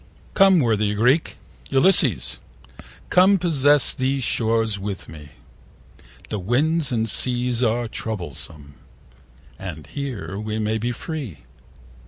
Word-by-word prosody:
COME, 195 -2 +5
worthy 105 -4 +1
Greek! 125 +9 +1 0.3
Ulysses, 165 - +3 0.7
come, 190 +2 +5
Possess 145 -5 +3
these 130 +1 -1
shores 115 -3 0
with 100 -1 -6
me: 75 -1 -12 1.0
The 105 - -3
winds 145 - +1
and 115 -2 0
seas 125 0 +1
are 120 0 0
troublesome, 80 - -6 0.8
And 85 -5 -7
here 130 -8 -6
we 110 0 -4
may 110 0 -1
be 120 +3 -2
free. 130 - -7
115 Hz, 110 wpm, -22 LUFS, 105-140 Hz, 1.0 s, COME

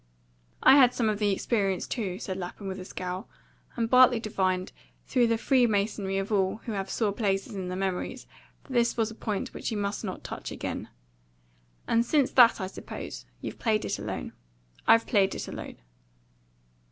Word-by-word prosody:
"I 265 +2 +8
had 250 -3 +6
some 225 -3 +1
of 210 -1 -1
the 210 -1 +2
experience 195 -2 0
too," 195 -7 -3
said 190 -1 -4
Lapham, 190 +2 -6
with 190 0 -4
a 185 - -7
scowl; 185 +2 -5 0.5
and 230 -2 0
Bartley 250 0 +6
divined, 185 -4 -1 0.3
through 245 -3 +3
the 230 0 +2
freemasonry 210 -6 +1
of 195 +2 -3
all 190 -2 +2
who 230 - -3
have 195 -2 -3
sore 215 -1 0
places 200 -1 -1
in 190 -2 -4
their 180 0 -4
memories, 190 -1 -3 0.4
that 270 - -10
this 235 -1 +2
was 225 -1 +1
a - - -8
point 220 +2 -3
which - - -4
he 225 - -3
must 205 +1 -2
not 185 -3 -5
touch - - -6
again. - - -5 1.0
"And 230 0 +3
since 275 +2 +2
that, 240 -3 +6
I 190 - -2
suppose, 185 - -8
you've - - -6
played 215 -2 +1
it - - -2
alone." - - -5 0.5
"I've 230 0 +6
played 195 -3 +2
it - - -5
alone." - - -7
210 Hz, 180 wpm, -28 LUFS, 195-235 Hz, 1.0 s, I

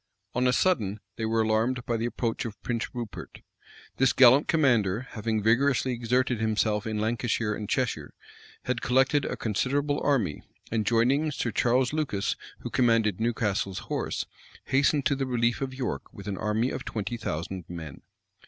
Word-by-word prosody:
On 125 +1 +2
a - - +4
sudden, 110 - +1 0.2
they 110 - -3
were 110 0 +2
alarmed 115 +3 +1
by 120 - 0
the 115 +1 -1
approach 115 -1 -2
of 115 -3 -7
Prince 115 -2 -1
Rupert. 120 -4 -7 0.6
This 135 0 +3
gallant 130 +2 +6
commander, 120 - +2
having 110 -1 -2
vigorously 130 +3 +3
exerted 125 0 0
himself 110 -1 0
in 110 -1 -2
Lancashire 110 0 0
and 105 -1 -5
Cheshire, 115 - -1 0.5
had 125 -1 -2
collected 135 +3 +3
a - - -3
considerable 140 +7 0
army; 120 - +1 0.3
and 110 -2 0
joining 130 +7 +3
Sir 125 -5 -2
Charles 125 +5 +2
Lucas, 140 -11 -1 0.3
who - - -6
commanded 115 -5 +2
Newcastle's 105 -4 -1 0.2
horse, - - -2 0.4
hastened 140 +1 +2
to 140 - +3
the 135 -1 -2
relief 120 -1 +1
of 135 -1 -2
York 125 - -4
with - - -11
an 100 - -2
army 110 +4 0
of - - -4
twenty 110 +2 -3
thousand 90 -4 -4
men. 80 -5 -8
115 Hz, 160 wpm, -27 LUFS, 110-130 Hz, 0.6 s, gallant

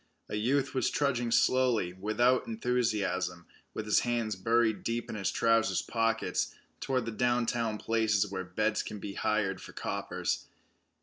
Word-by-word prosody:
A - - -3
youth 135 +6 +1
was 130 - +1
trudging 125 -5 0
slowly, 120 -7 +3
without 110 +7 +2
enthusiasm, 105 -7 -1 0.3
with 110 - -3
his 105 - +4
hands 115 -3 -1
buried 110 +2 +1
deep 115 +1 -2
in - - -5
his 95 -2 -1
trousers' 115 -4 +2
pockets, 115 -1 0 0.2
toward 130 -3 -1
the 115 - -3
downtown 120 -1 0
places 110 -2 +2
where 95 -2 -4
beds 105 +5 0
can 105 - -6
be 100 0 -6
hired 100 -3 0
for - - -11
coppers. - - -3
115 Hz, 145 wpm, -30 LUFS, 105-120 Hz, 0.3 s, his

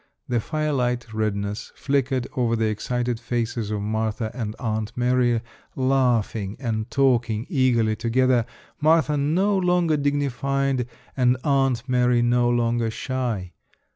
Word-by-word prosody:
The 120 -1 +1
firelight 125 -5 -1
redness 105 -1 -2
flickered 135 -2 0
over 120 -3 +1
the 110 0 0
excited 120 +2 -2
faces 115 -3 -2
of 105 -1 -2
Martha 110 +1 -2
and 110 -4 -4
Aunt 110 -2 -2
Mary 125 -1 +2 0.3
laughing 120 -6 +1
and 115 -3 -2
talking 120 -5 +1
eagerly 120 - +2
together, 120 +1 +2 0.3
Martha 155 0 +3
no 170 +8 +2
longer 180 -4 +2
dignified 135 -2 0 0.3
and 125 -1 +3
Aunt 135 -3 +1
Mary 125 -1 +3
no 120 0 +3
longer 120 -1 +1
shy. 115 -7 -3
125 Hz, 120 wpm, -24 LUFS, 115-135 Hz, 0.3 s, Martha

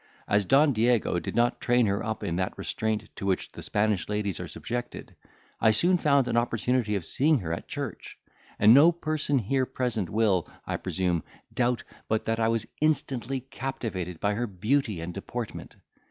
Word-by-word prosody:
As 100 -2 +2
Don 140 +1 +5
Diego 115 -5 +2
did - - -5
not 120 +1 +2
train 120 -1 +3
her 100 -1 0
up 110 -1 -3
in 85 - -2
that 95 0 -2
restraint 110 -1 -2
to 100 - -5
which 95 - -1
the - - -9
Spanish 105 -3 0
ladies 105 -4 -2
are - - -5
subjected, 120 0 -6 0.4
I 110 - +5
soon 175 +12 +3
found 140 -4 +3
an - - -1
opportunity 120 -1 +1
of 95 -5 -3
seeing 150 - +3
her 85 -2 -3
at 85 - -6
church; - - -6 0.4
and 105 +2 +7
no 150 +6 +8
person 155 -4 -1
here 130 +3 0
present 120 -8 -2
will, 105 -6 +1 0.2
I - - -2
presume, 90 -3 -1 0.3
doubt 125 -1 +1 0.2
but 110 0 0
that 115 0 0
I 110 - +3
was 115 -1 0 0.2
instantly 135 -4 0
captivated 110 -10 -5
by 105 0 +1
her 120 +3 -1
beauty 105 0 0
and 85 +1 -5
deportment. 115 +4 -6
115 Hz, 180 wpm, -27 LUFS, 100-130 Hz, 0.4 s, no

